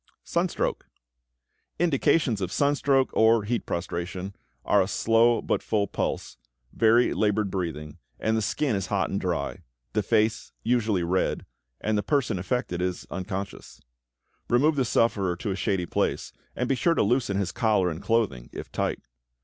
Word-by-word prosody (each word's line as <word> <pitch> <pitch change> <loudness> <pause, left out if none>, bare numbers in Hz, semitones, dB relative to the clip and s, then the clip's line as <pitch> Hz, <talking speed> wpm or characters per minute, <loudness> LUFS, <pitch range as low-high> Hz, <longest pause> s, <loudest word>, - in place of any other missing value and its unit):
=Sunstroke.= - - -1 0.9
Indications 140 -7 +2
of 90 -1 -2
sunstroke 140 0 +2
or 110 0 +4
heat 115 +1 -2
prostration 90 +2 -4 0.3
are - - +4
a - - 0
slow 115 +1 +3
but - - 0
full 105 -2 0
pulse, - - -3 0.4
very 115 +2 +4
labored 105 -2 +1
breathing, 80 -5 -4 0.2
and 110 0 +1
the 110 - +1
skin 130 +2 0
is 95 -2 -2
hot 100 0 0
and 100 - -1
dry, 90 -3 -2 0.3
the 105 - +2
face 110 +1 +1
usually 110 -6 +1
red, 90 +2 0 0.3
and 105 -1 0
the - - +1
person 135 - 0
affected 95 -3 -2
is 90 -1 -2
unconscious. 95 +1 -6 0.7
Remove 145 +6 +3
the 135 -2 +1
sufferer 100 -6 +1
to 100 +4 -4
a - - -1
shady 95 -2 -1
place, - - -1 0.2
and 125 - -1
be 135 - +2
sure 165 +6 +2
to - - +3
loosen 120 -6 +1
his 100 -2 -1
collar 105 -7 +2
and 80 - -6
clothing, 95 - 0
if - - -8
tight. - - -2
105 Hz, 155 wpm, -26 LUFS, 95-120 Hz, 0.9 s, or